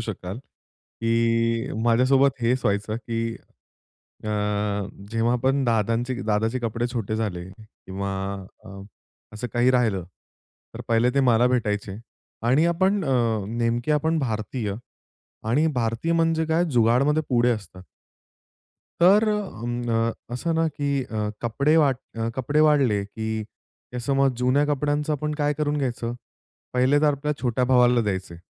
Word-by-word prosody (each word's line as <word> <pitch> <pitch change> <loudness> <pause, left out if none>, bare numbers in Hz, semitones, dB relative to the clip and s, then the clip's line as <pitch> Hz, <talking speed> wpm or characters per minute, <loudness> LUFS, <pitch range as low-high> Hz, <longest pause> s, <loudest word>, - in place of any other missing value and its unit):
शकाल, 105 -2 -5
की 115 -1 -2
माझ्यासोबत 130 +3 +3
हेच 125 +2 +1
व्हायचं, 105 +2 0
की 115 -1 -3 0.9
अ, - - -3 0.8
जेव्हा 115 +2 +1
पण 135 +1 +2
दादांचे 115 +2 0
दादाचे 110 +3 +1
कपडे 115 0 -2
छोटे 110 -2 -2
झाले 95 -6 -3
किंवा 100 -1 -7 0.5
अ, - - -12 0.7
असं 115 +4 -4
काही 120 +1 +3
राहिलं 110 -8 +1 0.7
तर - - -7
पहिले 115 +2 +3
ते 140 - +3
मला 120 -2 +4
भेटायचे. 105 -5 -1 0.5
आणि 135 +7 +4
आपण 190 +3 +1
अ, 115 -6 +1
नेमके 120 +4 0
आपण 160 +2 +1
भारतीय 110 -4 -3 0.7
आणि 145 +8 +3
भारतीय 115 +7 -1
म्हणजे 165 -1 +2
काय 160 +2 +2
जुगाडमध्ये 125 +6 +3
पुढे 120 -1 +3
असतात. 100 -5 -5 1.2
तर 200 +5 +6
अं 120 - -3 0.3
अ, - - -6 0.2
असं 165 +6 -1
ना 165 0 +2
की 145 -1 -4 0.2
अ, 105 -3 -3
कपडे 140 +7 +2
वाट 140 -5 +4 0.2
अ, 115 0 -1
कपडे 145 +4 +1
वाढले, 135 -10 +3
की 110 +1 -4 0.5
त्या 125 - -5
समज 135 +1 +2
जुन्या 130 +3 +2
कपड्यांचं 145 +1 0
आपण 150 +1 -2
काय 145 -1 0
करून 150 -1 0
घ्यायचं? 120 -3 -2 0.6
पहिले 130 +3 +3
तर - - +2
आपल्या 145 +2 -2
छोट्या 125 0 +1
भावाला 125 -1 +4
द्यायचे. 95 -5 -3
120 Hz, 135 wpm, -24 LUFS, 115-140 Hz, 1.2 s, तर